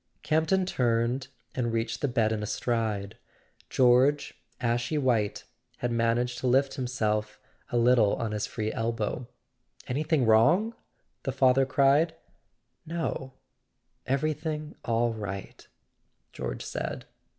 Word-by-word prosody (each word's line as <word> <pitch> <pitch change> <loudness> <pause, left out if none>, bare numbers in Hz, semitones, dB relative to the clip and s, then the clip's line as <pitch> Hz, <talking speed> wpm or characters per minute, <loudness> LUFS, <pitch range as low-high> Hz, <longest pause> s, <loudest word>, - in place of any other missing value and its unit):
Campton 160 +4 +2
turned 120 -3 0 0.3
and 120 -2 -1
reached 115 0 -2
the 145 - +2
bed 115 -4 +1
in 110 -1 -1
a 105 - -3
stride. 110 -4 -2 0.5
George, 130 +3 +4 0.3
ashy 120 +4 0
white, 120 -7 +1 0.3
had 120 - -2
managed 120 +1 +1
to 130 - -1
lift 135 +2 +3
himself 105 -4 -1 0.3
a 120 - +1
little 120 -3 +4
on 115 -2 -3
his 105 -1 -2
free 110 -1 -3
elbow. 115 +1 -2 0.6
"Anything 150 +1 +1
wrong?" 165 - +4 0.5
the 135 - -2
father 130 0 +4
cried. 145 +4 +3 0.7
"No; 155 -5 -3 0.7
everything 155 +2 -1
all 115 0 +1
right," 100 -3 -7 0.7
George - - -5
said. - - -4
120 Hz, 115 wpm, -28 LUFS, 115-140 Hz, 0.7 s, George